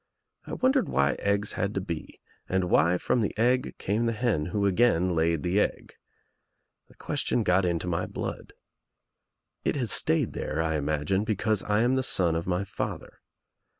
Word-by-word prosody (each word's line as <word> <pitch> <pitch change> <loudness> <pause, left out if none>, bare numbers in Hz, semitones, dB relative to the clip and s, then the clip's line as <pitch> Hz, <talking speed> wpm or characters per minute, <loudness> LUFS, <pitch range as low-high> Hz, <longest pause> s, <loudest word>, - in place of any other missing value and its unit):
I - - -6
wondered 260 0 +2
why 70 -2 +2
eggs 100 +1 0
had 100 0 -2
to - - +1
be 85 -5 -6 0.3
and 95 -1 0
why 85 +3 +4
from 120 - 0
the 105 - -2
egg 125 +3 +1
came 110 +4 -1
the 115 - 0
hen 105 -9 0
who 100 +3 -1
again 95 -3 +3
laid 80 -1 +1
the 90 +3 +1
egg. - - -2 0.9
The - - -21
question 120 - -1
got 90 0 +3
into 85 0 -1
my 90 0 -1
blood. - - -6 1.1
It - - 0
has 125 -7 0
stayed - - +2
there, 75 - -3
I 80 0 0
imagine, 75 +6 0
because 110 -1 0
I 105 +1 +1
am 125 +3 +2
the - - +2
son 85 -9 +1
of 85 +1 -3
my 90 +1 0
father. 100 - -6
95 Hz, 175 wpm, -27 LUFS, 85-110 Hz, 1.1 s, why